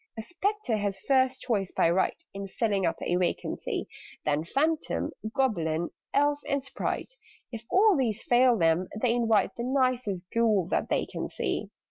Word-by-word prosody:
"A 220 Hz, -, -4 dB
Spectre 380 Hz, -, -1 dB
has 200 Hz, -2 st, -2 dB
first 260 Hz, -1 st, +2 dB
choice, 200 Hz, -6 st, -1 dB
by -, -, +2 dB
right, 185 Hz, +2 st, +1 dB
In 195 Hz, 0 st, -5 dB
filling 200 Hz, -2 st, 0 dB
up -, -, 0 dB
a 175 Hz, -, 0 dB
vacancy; 180 Hz, -1 st, -2 dB, 0.4 s
Then 150 Hz, +1 st, +1 dB
Phantom, 305 Hz, -, 0 dB, 0.2 s
Goblin, 170 Hz, -, 0 dB, 0.2 s
Elf, 290 Hz, +1 st, +2 dB
and 280 Hz, -1 st, 0 dB
Sprite 270 Hz, -, -4 dB, 0.4 s
If 230 Hz, -1 st, -7 dB
all 410 Hz, +1 st, +5 dB
these 235 Hz, -6 st, 0 dB
fail 245 Hz, 0 st, +4 dB
them, 165 Hz, +1 st, +2 dB
they 235 Hz, 0 st, +2 dB
invite 225 Hz, -3 st, +2 dB
The 235 Hz, -, -4 dB
nicest 255 Hz, -7 st, 0 dB
Ghoul 220 Hz, -5 st, +3 dB
that -, -, 0 dB
they -, -, +1 dB
can -, -, -5 dB
see. -, -, -2 dB
230 Hz, 160 wpm, -28 LUFS, 195-265 Hz, 0.4 s, all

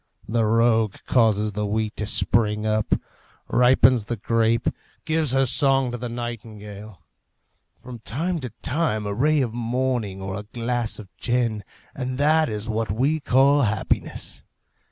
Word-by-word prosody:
The 115 Hz, +1 st, +1 dB
rogue 115 Hz, -1 st, +3 dB
causes 110 Hz, -3 st, +2 dB
the 105 Hz, +1 st, -2 dB
wheat 110 Hz, +1 st, -1 dB
to 105 Hz, -, -3 dB
spring 105 Hz, -1 st, +1 dB
up, 110 Hz, -1 st, +1 dB, 0.5 s
ripens 125 Hz, -2 st, +4 dB
the 120 Hz, -, -3 dB
grape, 115 Hz, +2 st, +1 dB, 0.4 s
gives 160 Hz, -3 st, +1 dB
her 135 Hz, 0 st, +3 dB
song 135 Hz, 0 st, +3 dB
to 120 Hz, -, -4 dB
the 120 Hz, 0 st, -4 dB
nightingale. 110 Hz, -5 st, -8 dB, 0.8 s
From 125 Hz, -1 st, -9 dB
time 165 Hz, +11 st, -2 dB
to 130 Hz, -4 st, -5 dB
time 130 Hz, -8 st, 0 dB
a 100 Hz, -, -2 dB
ray 145 Hz, +6 st, +2 dB
of 120 Hz, -4 st, -2 dB
morning 120 Hz, -4 st, -1 dB
or 95 Hz, 0 st, -5 dB
a 105 Hz, 0 st, -11 dB
glass 120 Hz, -1 st, -1 dB
of 100 Hz, -3 st, -12 dB
gin, 120 Hz, -4 st, 0 dB, 0.3 s
and 130 Hz, -1 st, -4 dB
that 155 Hz, +2 st, +3 dB
is 105 Hz, +1 st, -4 dB
what 110 Hz, -2 st, -1 dB
we 135 Hz, +9 st, +1 dB
call 140 Hz, +1 st, +4 dB
happiness! 110 Hz, -4 st, -2 dB
115 Hz, 150 wpm, -23 LUFS, 110-130 Hz, 0.8 s, ripens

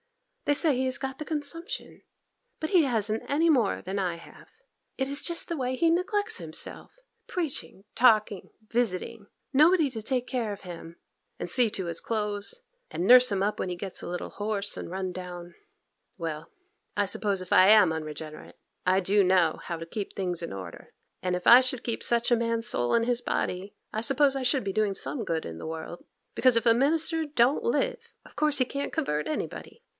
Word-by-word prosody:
They 290 Hz, -, +3 dB
say 300 Hz, -2 st, +3 dB
he 255 Hz, -, 0 dB
has 260 Hz, 0 st, +1 dB
got 265 Hz, -1 st, -5 dB
the -, -, -3 dB
consumption, 330 Hz, -, -5 dB, 0.6 s
but 315 Hz, -, -3 dB
he 360 Hz, -5 st, +6 dB
hasn't 220 Hz, -4 st, 0 dB
any 320 Hz, +4 st, +3 dB
more 245 Hz, -10 st, +2 dB
than 190 Hz, +2 st, -4 dB
I 180 Hz, -3 st, -1 dB
have. 170 Hz, -, -15 dB, 0.5 s
It 265 Hz, -, 0 dB
is 280 Hz, +1 st, 0 dB
just 340 Hz, -1 st, 0 dB
the 340 Hz, -, -3 dB
way 260 Hz, -3 st, -2 dB
he 335 Hz, +3 st, +3 dB
neglects 410 Hz, +5 st, 0 dB
himself!—preaching, 345 Hz, -, -6 dB
talking, 215 Hz, -5 st, +3 dB
and 215 Hz, -1 st, -32 dB
visiting—nobody 245 Hz, -, +1 dB
to 225 Hz, -3 st, -5 dB
take 250 Hz, +2 st, -1 dB
care 240 Hz, -5 st, -2 dB
of 200 Hz, -, -7 dB
him, 170 Hz, -2 st, -9 dB, 0.4 s
and -, -, -3 dB
see 245 Hz, -3 st, +4 dB
to 190 Hz, -3 st, -4 dB
his 170 Hz, -1 st, -4 dB
clothes, 210 Hz, -, -3 dB, 0.3 s
and 175 Hz, -, -3 dB
nurse 250 Hz, +1 st, +8 dB
him 195 Hz, -1 st, 0 dB
up 210 Hz, +1 st, -1 dB
when 185 Hz, -, -2 dB
he 180 Hz, -, -3 dB
gets 190 Hz, +1 st, -6 dB
a -, -, -7 dB
little 175 Hz, 0 st, -5 dB
hoarse 205 Hz, -1 st, -2 dB
and -, -, -6 dB
run 185 Hz, 0 st, -4 dB
down. 175 Hz, -1 st, -8 dB, 0.6 s
Well, 160 Hz, -3 st, -5 dB, 0.5 s
I 205 Hz, -, +3 dB
suppose 200 Hz, -1 st, 0 dB
if 180 Hz, -, -3 dB
I 185 Hz, -, +7 dB
am 210 Hz, -6 st, +6 dB
unregenerate, 155 Hz, 0 st, -7 dB, 0.3 s
I 185 Hz, +1 st, +4 dB
do 200 Hz, +2 st, +3 dB
know 180 Hz, -4 st, +3 dB
how 170 Hz, -, -4 dB
to 165 Hz, -, -7 dB
keep 200 Hz, +4 st, -6 dB
things 180 Hz, -3 st, -2 dB
in 170 Hz, -, -5 dB
order; 95 Hz, -3 st, -9 dB, 0.3 s
and 180 Hz, 0 st, -1 dB
if 180 Hz, -, -4 dB
I 245 Hz, +2 st, +10 dB
should 255 Hz, -1 st, -3 dB
keep 230 Hz, -, -3 dB
such 235 Hz, 0 st, +1 dB
a -, -, +7 dB
man's 230 Hz, 0 st, -1 dB
soul 120 Hz, -, 0 dB
in 230 Hz, -, +3 dB
his 240 Hz, 0 st, 0 dB
body, 190 Hz, -4 st, -3 dB, 0.2 s
I 220 Hz, -, -1 dB
suppose 275 Hz, +2 st, +2 dB
I 270 Hz, -, -2 dB
should 255 Hz, 0 st, +1 dB
be 195 Hz, -, -2 dB
doing 210 Hz, -1 st, +1 dB
some 235 Hz, +4 st, -3 dB
good 165 Hz, -5 st, -2 dB
in 80 Hz, 0 st, -7 dB
the -, -, -7 dB
world; 160 Hz, +2 st, -7 dB, 0.3 s
because 255 Hz, -3 st, +4 dB
if 230 Hz, -, 0 dB
a 230 Hz, -, +6 dB
minister 320 Hz, +5 st, +2 dB
don't 280 Hz, -, +2 dB
live, 470 Hz, 0 st, -1 dB
of -, -, -17 dB
course 305 Hz, -1 st, +2 dB
he 255 Hz, -, +3 dB
can't 280 Hz, +3 st, -4 dB
convert 150 Hz, -, -1 dB
anybody. 465 Hz, +8 st, -5 dB
225 Hz, 200 wpm, -27 LUFS, 185-280 Hz, 0.6 s, I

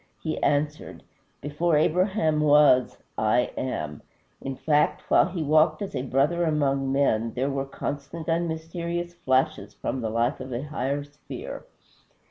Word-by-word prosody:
he 155 Hz, -, -3 dB
answered, 150 Hz, +1 st, -1 dB, 0.4 s
"Before 150 Hz, +3 st, +1 dB
Abraham 160 Hz, 0 st, +2 dB
was, 145 Hz, -4 st, +5 dB, 0.2 s
I 110 Hz, +3 st, +2 dB
AM." 75 Hz, -, -4 dB, 0.4 s
In 135 Hz, 0 st, -4 dB
fact, 150 Hz, +2 st, +1 dB
while -, -, +5 dB
he 170 Hz, -3 st, -3 dB
walked 155 Hz, +1 st, +3 dB
as 195 Hz, 0 st, -6 dB
a -, -, -1 dB
brother 140 Hz, +7 st, +1 dB
among 140 Hz, -4 st, +1 dB
men, 115 Hz, -5 st, +1 dB
there 135 Hz, +3 st, 0 dB
were 135 Hz, 0 st, -2 dB
constant 140 Hz, +3 st, -6 dB
and 170 Hz, +1 st, +1 dB
mysterious 170 Hz, +2 st, -4 dB
flashes 135 Hz, -1 st, 0 dB
from 130 Hz, -, -3 dB
the 110 Hz, -, -2 dB
life 120 Hz, +4 st, 0 dB
of 130 Hz, -, -7 dB
a 120 Hz, +3 st, -3 dB
higher 145 Hz, -1 st, -2 dB
sphere. 145 Hz, 0 st, -9 dB
145 Hz, 145 wpm, -26 LUFS, 135-160 Hz, 0.4 s, was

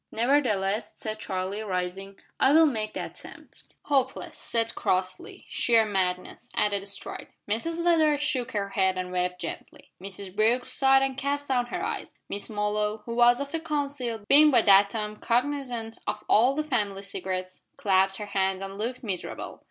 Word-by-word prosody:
"Nevertheless," 220 Hz, -5 st, +1 dB
said 215 Hz, -1 st, -5 dB
Charlie, 190 Hz, +1 st, -3 dB
rising, 195 Hz, 0 st, -4 dB, 0.2 s
"I 270 Hz, -, +5 dB
will 320 Hz, +1 st, +7 dB
make 220 Hz, -7 st, -2 dB
the -, -, -3 dB
attempt." -, -, -11 dB, 0.2 s
"Hopeless," 265 Hz, -2 st, -1 dB
said 230 Hz, -1 st, -2 dB
Crossley. 185 Hz, 0 st, -2 dB
"Sheer 230 Hz, -2 st, +3 dB
madness," 190 Hz, +3 st, -2 dB
added 200 Hz, -1 st, 0 dB
Stride. 200 Hz, -, -5 dB, 0.2 s
Mrs 330 Hz, +11 st, -2 dB
Leather 315 Hz, -4 st, +4 dB
shook 265 Hz, -4 st, -1 dB
her 200 Hz, -2 st, -1 dB
head 190 Hz, -1 st, +1 dB
and 180 Hz, 0 st, -3 dB
wept 180 Hz, 0 st, -1 dB
gently. 165 Hz, -, -8 dB
Mrs 195 Hz, 0 st, -8 dB
Brooke 225 Hz, +4 st, +2 dB
sighed 270 Hz, 0 st, +4 dB
and 265 Hz, -1 st, -2 dB
cast 285 Hz, +1 st, -2 dB
down 245 Hz, -2 st, +1 dB
her -, -, -3 dB
eyes. -, -, -5 dB
Miss 205 Hz, -, -2 dB
Molloy 210 Hz, 0 st, -1 dB
who 235 Hz, -, -4 dB
was 240 Hz, +1 st, +5 dB
of 280 Hz, 0 st, -4 dB
the 325 Hz, -, -2 dB
council, 285 Hz, -7 st, -2 dB
being 300 Hz, +2 st, +7 dB
by 240 Hz, -6 st, +4 dB
that 200 Hz, 0 st, +6 dB
time 210 Hz, 0 st, -4 dB
cognisant 245 Hz, -2 st, -1 dB
of -, -, -3 dB
all 245 Hz, +5 st, +4 dB
the 305 Hz, -, 0 dB
family 205 Hz, -9 st, -2 dB
secrets 185 Hz, -1 st, -5 dB, 0.2 s
clasped 190 Hz, -1 st, +2 dB
her 210 Hz, -, -5 dB
hands 195 Hz, -1 st, -1 dB
and 195 Hz, +1 st, -7 dB
looked 245 Hz, +4 st, -3 dB
miserable. 195 Hz, -6 st, -5 dB
215 Hz, 165 wpm, -27 LUFS, 195-265 Hz, 0.2 s, will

